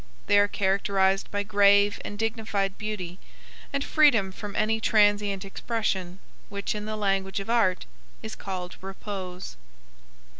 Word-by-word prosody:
They 205 - +5
are 205 - +4
characterized 195 -1 +1
by 205 0 -1
grave 200 0 +4
and 205 - -6
dignified 215 -3 -2
beauty, 195 -4 -5 0.5
and 280 0 -1
freedom 240 -13 +4
from 205 +1 -8
any 220 +1 +1
transient 205 -2 +2
expression, 195 -3 -2 0.3
which 200 0 -3
in 210 0 -5
the 215 0 -3
language 195 -1 0
of 205 +3 -4
art 210 -6 +2 0.4
is 220 - -6
called 185 -2 -6
repose. 190 - -7
200 Hz, 135 wpm, -26 LUFS, 195-215 Hz, 0.5 s, They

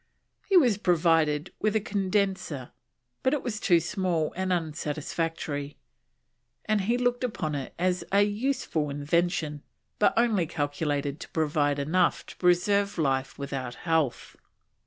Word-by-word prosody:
He 390 - +6
was 245 - +4
provided 165 -3 +2
with 215 0 +1
a - - +4
condenser, 195 -9 -1 0.5
but 260 +3 +2
it 285 - -4
was 220 -4 -3
too 175 -6 +4
small 170 -2 -1
and 190 +1 -1
unsatisfactory, 155 -2 -3 0.9
and 215 -1 +1
he 230 +5 +1
looked 245 0 0
upon 185 -11 -2
it 140 -2 -5
as 180 +1 0
"a 200 +1 +5
useful 210 - -1
invention, 150 +1 0 0.4
but 210 - +4
only 220 -8 +3
calculated 145 -1 -2
to - - -9
provide 145 -2 +1
enough 165 +6 +1
to - - -12
preserve 200 +3 +2
life 135 -4 0
without 135 -3 -4
health." 160 -6 0
170 Hz, 135 wpm, -27 LUFS, 150-205 Hz, 0.9 s, He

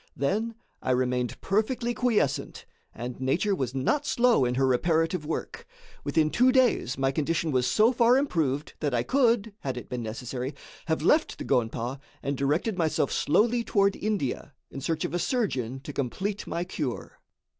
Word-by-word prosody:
Then 215 +11 -1 0.3
I - - -4
remained 125 -1 0
perfectly 235 +4 0
quiescent 220 - 0 0.3
and 120 +2 -7
nature 170 +10 +1
was 130 -7 -2
not 280 - 0
slow 240 - +3
in 125 0 0
her 135 +1 +2
reparative 160 +4 +1
work. 160 - -5 0.4
Within 155 +1 +1
two 255 +2 +4
days 250 - +2
my 135 0 +1
condition 155 +3 0
was 130 -2 +2
so 220 - +4
far 240 +1 +5
improved 155 - 0
that 145 -4 0
I 120 - +1
could, 230 - +2
had 130 -2 -4
it 125 - -8
been 125 -1 -3
necessary, 125 +4 -5 0.3
have 160 -2 0
left 310 - +3
the - - -6
gonpa 120 +2 -1 0.2
and 140 +1 -1
directed 155 - 0
myself 155 -4 +1
slowly 235 +9 +2
toward 200 -3 +2
India 160 - -2 0.2
in 135 - -7
search 160 +3 -1
of - - -4
a 175 - 0
surgeon 135 - -1
to 145 - -8
complete 190 - -3
my 170 - -2
cure. 150 -8 -5
155 Hz, 165 wpm, -27 LUFS, 130-215 Hz, 0.4 s, far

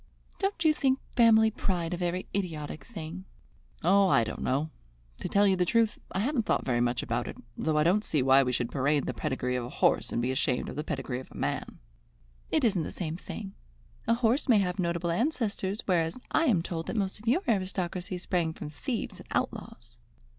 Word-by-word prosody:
"Don't 390 -4 -1
you 310 - +6
think 270 -3 +2 0.2
family 220 -2 +6
pride 180 -5 -2
a - - -2
very 180 +1 -2
idiotic 155 -7 -3
thing?" 165 +6 -7 0.6
"Oh, 195 +3 +5
I 115 - +4
don't - - -5
know. 145 +5 0 0.5
To - - -4
tell 200 +1 +4
you 195 -1 +4
the 180 - +2
truth, 225 +4 +2
I 190 - -1
haven't 245 -1 0
thought - - +1
very 120 -2 +1
much 120 0 +1
about - - -2
it, - - -7 0.2
though 155 +4 0
I 150 - +4
don't 190 +6 +3
see 150 -9 +1
why 135 +1 +6
we 125 -2 0
should 120 -1 -1
parade 145 +1 +1
the - - -2
pedigree 130 -4 -2
of 125 - -1
a - - -7
horse - - +2
and - - 0
be 125 +2 0
ashamed 130 -1 0
of - - -7
the 150 - -2
pedigree 125 -5 -3
of 130 - -11
a - - -11
man." - - -3 0.7
"It 310 - +1
isn't 205 -7 +3
the - - -3
same 160 -3 -4
thing. 195 +2 -7 0.5
A 230 - +4
horse 245 +4 +1
may 230 - +7
have 190 -1 0
notable 170 -1 0
ancestors, 215 - -1
whereas 170 +2 +1
I 325 - +3
am 200 - +3
told 165 -2 -4
that - - -3
most 195 -2 -1
of 225 - -14
your 310 - +3
aristocracy 185 -3 -1
sprang 175 -2 -1
from 150 - -7
thieves 230 - -4
and - - -12
outlaws." - - -4
180 Hz, 210 wpm, -29 LUFS, 155-220 Hz, 0.7 s, may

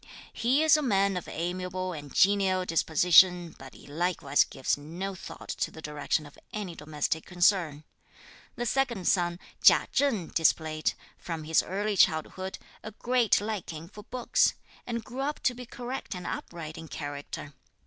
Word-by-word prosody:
He 260 +6 +2
is 315 -1 +6
a - - 0
man 200 -7 +2
of 180 - -4
amiable 180 +2 -3
and 145 -3 -8
genial 190 0 +3
disposition, 175 +1 +4
but 135 -1 -11
he - - -15
likewise 155 -2 +1
gives 130 - -1
no 170 +7 -5
thought 185 - -10
to - - 0
the - - -12
direction 150 0 -2
of 145 - -15
any 205 -5 -5
domestic 150 +1 -2
concern. 175 -4 +2 0.7
The 240 - -3
second 235 -7 0
son 175 -2 +2 0.2
Chia - - +6
Cheng 245 - +1
displayed, 155 -1 +1 0.3
from 165 -2 -5
his 160 +1 +3
early 205 +2 -2
childhood, 185 +2 +1 0.2
a 215 - -8
great 245 -1 +2
liking 180 -7 -5
for 210 - -12
books, 245 +3 +1 0.3
and 235 -2 -3
grew 250 +4 -6
up 295 +2 -2
to 250 - +3
be 250 0 -9
correct 245 -2 -6
and 180 - -7
upright 160 -2 -6
in 160 - -9
character. 145 -1 -6
180 Hz, 160 wpm, -28 LUFS, 160-210 Hz, 0.7 s, is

